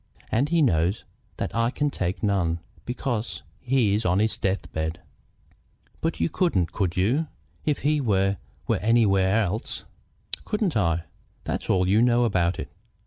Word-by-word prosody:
And 135 +6 +2
he 165 -1 +3
knows 90 - +1 0.3
that - - -3
I 115 0 +2
can 145 +2 -1
take 95 -2 -2
none, 90 -5 +1 0.3
because 120 -2 -3 0.2
he 125 -5 +2
is 105 +2 +1
on 90 -1 +2
his 110 +2 +2
death 95 0 -2
bed." 80 +1 -2 1.0
"But 165 - -2
you - - +2
couldn't, 160 - +1
could 90 -4 -1
you, 125 - +2 0.4
if 150 -3 0
he 150 +1 +2
were 100 -4 +2 0.3
were - - +2
anywhere 105 -2 +3
else?" 100 +3 -3 0.6
"Couldn't 210 - -1
I? 85 -5 +1 0.4
That's - - -3
all 90 -1 +3
you 105 +4 +4
know 120 0 +4
about 90 -6 +1
it. - - -6
105 Hz, 155 wpm, -25 LUFS, 95-125 Hz, 1.0 s, you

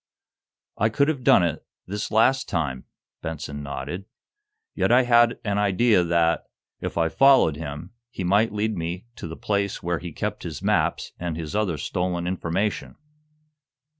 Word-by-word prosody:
"I 110 - +3
could 140 +7 +2
have 140 -5 -2
done 90 - +6
it, 85 -3 -1 0.2
this 105 +3 -4
last 120 +5 +3
time," 75 -7 -2 0.4
Benson 75 -2 -5
nodded. 70 +6 -5 0.7
"Yet - - +1
I 125 +2 +6
had 120 -1 +4
an 100 -1 0
idea 105 0 +3
that, 85 -1 +1 0.3
if - - -5
I 85 -1 +3
followed 135 - +5
him, 75 +3 -7 0.2
he 95 - -5
might 100 +5 +3
lead 105 +1 -1
me 85 +3 -4
to - - -6
the 80 - -7
place 100 -1 -1
where 85 -1 -1
he 85 -1 -7
kept - - -4
his - - -6
maps - - +1
and 85 -2 -3
his 80 0 -5
other 100 -7 0
stolen 90 +3 -2
information. 95 +3 -2
90 Hz, 160 wpm, -24 LUFS, 80-110 Hz, 0.7 s, done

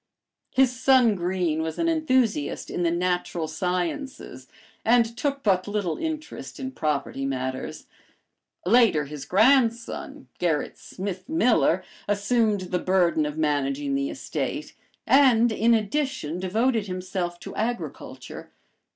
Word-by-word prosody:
His 255 -1 +2
son 255 -4 +5
Greene 175 -3 -1
was 160 0 -3
an 335 - 0
enthusiast 260 - +1
in - - -2
the 170 - +2
natural 175 -1 -1
sciences 180 - -3 0.4
and 235 0 +3
took 280 +2 -2
but 190 -3 +2
little 205 -6 -2
interest 315 0 -5
in 260 -1 -4
property 150 - -2
matters. 130 -1 -4 0.8
Later, 205 -8 +4
his 145 -1 -8
grandson, 245 - +2
Gerrit 160 -4 -1
Smith 190 +3 -6
Miller, 225 - +3 0.2
assumed 205 0 +1
the 180 0 -2
burden 175 -5 +2
of 150 +1 -6
managing 145 -2 0
the 140 0 0
estate 140 +2 -4 0.3
and, 245 -3 +5
in 230 +2 +3
addition, 215 - -2
devoted 220 +4 0
himself 180 -1 -4
to - - -8
agriculture. 235 +2 -5
190 Hz, 120 wpm, -25 LUFS, 160-245 Hz, 0.8 s, son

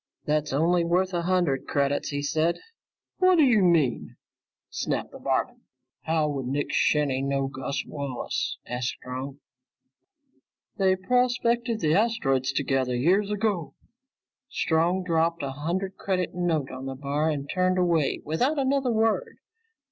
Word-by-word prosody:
"That's 150 0 0
only 170 +5 +2
worth 180 +2 +1
a 175 - 0
hundred 175 -6 0
credits," 140 0 0
he 145 -1 -3
said. 160 +3 +1 0.6
"Whaddya 310 - +5
mean!" 165 -9 +2 0.6
snapped - - -2
the - - -11
barman. - - -1 0.4
"How 160 -1 +1
would 135 -4 -3
Nick 145 +3 -2
Shinny 140 -3 +2
know 135 0 0
Gus 135 +1 -4
Wallace?" 140 -4 -3
asked 125 0 -3
Strong. 130 +2 -7 1.4
"They 190 -1 +3
prospected 240 +2 +1
the 155 -2 +2
asteroids 165 - +1
together 135 -3 0
years 185 +11 +2
ago." 205 -6 -1 0.7
Strong 170 +3 +1
dropped 165 -2 0
a 135 - -2
hundred 175 +7 -3
credit 185 -2 -1
note 165 -6 -1
on 130 +1 -7
the 135 - -4
bar 145 +3 -1
and 145 -2 -3
turned 185 +3 +1
away 170 -5 +1
without 250 - 0
another 270 -2 +1
word. 225 - 0
165 Hz, 135 wpm, -26 LUFS, 140-190 Hz, 1.4 s, Whaddya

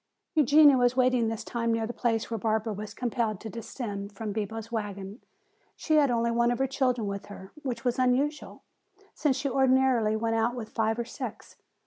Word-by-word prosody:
Eugenia 295 -2 +6
was 245 +1 +2
waiting 250 -2 +3
this 225 -1 -3
time 230 -1 -2
near 225 -1 0
the 235 - -5
place 230 -2 -1
where 225 - -1
Barbara 220 +1 0
was 210 +1 -7
compelled 230 -4 -1
to 220 - -7
descend 210 -3 -6
from 215 0 -5
Bibo's 220 +1 -4
wagon. 205 0 -5 0.5
She 310 -1 +1
had 290 -2 +4
only 235 -1 +1
one 235 +1 +2
of 245 - 0
her 270 - +1
children 255 -4 0
with 200 0 -5
her, 190 -1 -11
which 245 -4 -4
was 245 +1 0
unusual, 275 +4 0 0.5
since 285 -4 +1
she 275 +2 -2
ordinarily 260 -4 +3
went 225 +1 0
about 230 +2 +1
with 225 -3 -6
five 225 -1 0
or 235 - -2
six. - - -7
235 Hz, 190 wpm, -28 LUFS, 220-255 Hz, 0.5 s, Eugenia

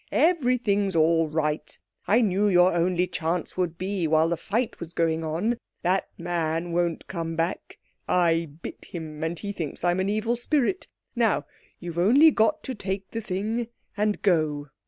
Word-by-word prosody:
Everything's 245 - +2
all 165 0 +4
right. 150 0 -2 0.3
I 230 +4 +4
knew 205 -1 +2
your 180 -2 +5
only 175 +1 +2
chance 170 0 -2
would 175 -3 -1
be 185 -2 -1
while 160 +1 +3
the 170 - +1
fight 225 +7 -2
was 170 -1 -8
going 165 -1 +1
on. 175 +10 -1 0.3
That 185 +2 +1
man 170 -1 -2
won't 170 -1 0
come 165 -3 -4
back. 165 +2 -3 0.3
I 165 -2 +2
bit - - -8
him, 155 -3 -7
and 165 +1 -2
he 200 +3 -4
thinks 165 -7 -5
I'm 175 +1 +2
an 190 +1 0
Evil 215 +3 0
Spirit. 290 +8 0 0.3
Now 225 -11 +2 0.3
you've 170 -1 -5
only 270 - +6
got 235 +5 +2
to 265 - -4
take 195 -3 -4
the 225 - -3
thing 215 +4 -2 0.3
and 210 0 0
go." 155 -6 +1
180 Hz, 165 wpm, -26 LUFS, 165-210 Hz, 0.3 s, only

